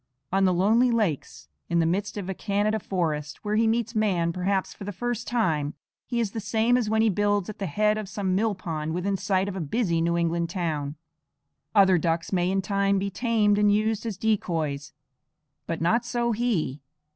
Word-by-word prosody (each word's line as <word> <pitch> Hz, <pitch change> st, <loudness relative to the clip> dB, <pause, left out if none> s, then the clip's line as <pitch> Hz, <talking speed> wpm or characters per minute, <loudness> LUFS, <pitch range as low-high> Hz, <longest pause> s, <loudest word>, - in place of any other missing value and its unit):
On 195 Hz, +1 st, +3 dB
the 185 Hz, -, +3 dB
lonely 225 Hz, +7 st, +4 dB
lakes 215 Hz, -, -1 dB, 0.2 s
in 170 Hz, -, +1 dB
the 165 Hz, -, +3 dB
midst 195 Hz, +6 st, -1 dB
of 195 Hz, -3 st, -4 dB
a 190 Hz, -, -2 dB
Canada 210 Hz, +3 st, 0 dB
forest, 155 Hz, -6 st, -3 dB
where 210 Hz, 0 st, 0 dB
he 225 Hz, +1 st, +3 dB
meets 230 Hz, 0 st, 0 dB
man 185 Hz, -7 st, +1 dB
perhaps 190 Hz, +2 st, -1 dB
for -, -, -10 dB
the 205 Hz, -, -4 dB
first 240 Hz, +3 st, -3 dB
time, 160 Hz, -12 st, 0 dB, 0.3 s
he 240 Hz, -2 st, -1 dB
is 220 Hz, -4 st, 0 dB
the 225 Hz, -, -4 dB
same 220 Hz, +3 st, +2 dB
as 240 Hz, -4 st, +1 dB
when 220 Hz, 0 st, +3 dB
he 225 Hz, -, +4 dB
builds 205 Hz, 0 st, +1 dB
at -, -, -15 dB
the 195 Hz, -, -2 dB
head 210 Hz, +6 st, +1 dB
of 210 Hz, -3 st, -6 dB
some 195 Hz, -2 st, -1 dB
mill 210 Hz, +2 st, +1 dB
pond 160 Hz, -3 st, -4 dB
within 195 Hz, +3 st, 0 dB
sight 190 Hz, 0 st, 0 dB
of 200 Hz, -, -4 dB
a -, -, -3 dB
busy 170 Hz, -, 0 dB
New 170 Hz, +1 st, +1 dB
England 170 Hz, 0 st, 0 dB
town. 155 Hz, -6 st, -2 dB, 0.8 s
Other 190 Hz, -3 st, +6 dB
ducks 165 Hz, +3 st, -1 dB
may 180 Hz, -1 st, +2 dB
in 195 Hz, 0 st, 0 dB
time 200 Hz, 0 st, +1 dB
be 200 Hz, +1 st, -1 dB
tamed 210 Hz, -1 st, +2 dB
and 210 Hz, 0 st, +4 dB
used 215 Hz, +1 st, +1 dB
as 210 Hz, -5 st, -4 dB
decoys; 160 Hz, -10 st, -1 dB, 0.8 s
but 165 Hz, -1 st, -3 dB
not 225 Hz, +8 st, +2 dB
so 235 Hz, 0 st, -1 dB
he. 210 Hz, -, -1 dB
195 Hz, 205 wpm, -26 LUFS, 170-215 Hz, 0.8 s, Other